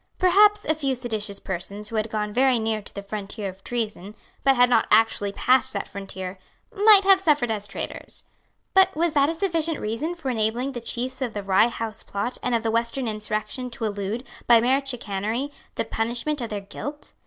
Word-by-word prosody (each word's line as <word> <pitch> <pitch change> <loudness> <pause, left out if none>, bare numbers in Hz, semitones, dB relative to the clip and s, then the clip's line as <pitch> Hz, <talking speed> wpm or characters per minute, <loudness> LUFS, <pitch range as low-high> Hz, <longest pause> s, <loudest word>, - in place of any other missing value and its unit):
Perhaps 410 +3 +5
a 315 - +3
few 275 -4 -1
seditious 215 -5 -4
persons 200 +3 -4
who 230 - -6
had 215 +1 0
gone 210 -1 -2
very 260 +1 +4
near 220 -1 -1
to - - -11
the 200 - -5
frontier 200 +1 -5
of 190 +1 -13
treason, 215 -4 -4 0.3
but 270 -1 +5
had 245 0 +6
not 240 -3 +3
actually 215 -2 +3
passed 255 +5 +3
that 200 - -3
frontier, 190 -1 -7 0.4
might 410 -1 +7
have 385 -1 +6
suffered 295 -10 +2
as 205 -2 -3
traitors. 200 - -6 0.5
But 380 0 +5
was 330 0 +1
that 285 -1 +4
a 330 - -2
sufficient 330 -3 0
reason 235 +11 -3
for 300 -6 -3
enabling 235 +4 0
the 240 -3 -6
chiefs 255 +3 -3
of 240 -4 -3
the 205 - -3
Rye 195 +3 +4
House 225 -2 -4
Plot 205 +5 -4
and 245 - 0
of 230 - 0
the 225 - 0
Western 235 +3 -1
Insurrection 215 +3 -3
to 235 -1 -4
elude, 205 +3 -3 0.2
by 235 -1 +7
mere 260 +4 +2
chicanery, 235 +1 -3 0.2
the - - -1
punishment 240 +7 -2
of 235 - -4
their 205 -1 -4
guilt? 290 +9 -8
235 Hz, 200 wpm, -24 LUFS, 210-275 Hz, 0.5 s, might